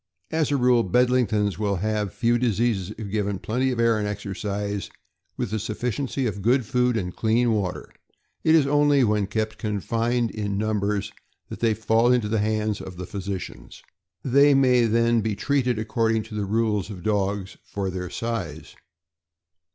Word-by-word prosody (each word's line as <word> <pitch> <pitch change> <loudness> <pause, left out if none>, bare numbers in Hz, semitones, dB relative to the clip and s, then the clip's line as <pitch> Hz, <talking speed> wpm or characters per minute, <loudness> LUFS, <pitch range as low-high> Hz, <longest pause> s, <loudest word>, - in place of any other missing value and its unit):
As 160 -2 +1
a 145 - +2
rule, 125 -2 +4
Bedlingtons 110 -2 +1
will 100 -2 0
have 105 +1 -1
few 120 +3 +1
diseases 115 -5 0
if 105 -3 -6
given 100 -2 -1
plenty 125 +7 -1
of 125 -2 -2
air 115 -2 +3
and 105 - -1
exercise, 100 0 -4 0.5
with 105 - -3
a 110 - 0
sufficiency 125 +5 -2
of 105 -3 -3
good 120 +4 +2
food 125 +1 +1
and 90 -4 -4
clean 115 +2 +2
water. 100 -5 -2 0.6
It 160 0 +5
is 155 -4 +5
only 145 -1 +4
when 105 -3 +1
kept 110 +1 -3
confined 115 +3 -1
in 100 -2 -3
num 110 0 0
bers 100 0 -1 0.4
that - - -7
they 115 -2 +2
"fall 115 +2 +2
into 120 -4 +2
the 110 0 +1
hands 110 0 -1
of 90 -1 -9
the 90 - -5
physicians." 95 -1 -7 0.4
They 140 +2 +5
may 125 -3 +4
then 115 +1 +2
be 110 -1 -1
treated 125 -1 0
according 110 0 0
to 110 - -12
the 105 -1 -2
rules 105 -2 0
for 105 - -7
dogs 100 0 -2 0.2
of 95 -2 -2
their 90 -1 -4
size. 100 -10 -5
110 Hz, 170 wpm, -24 LUFS, 100-120 Hz, 0.6 s, It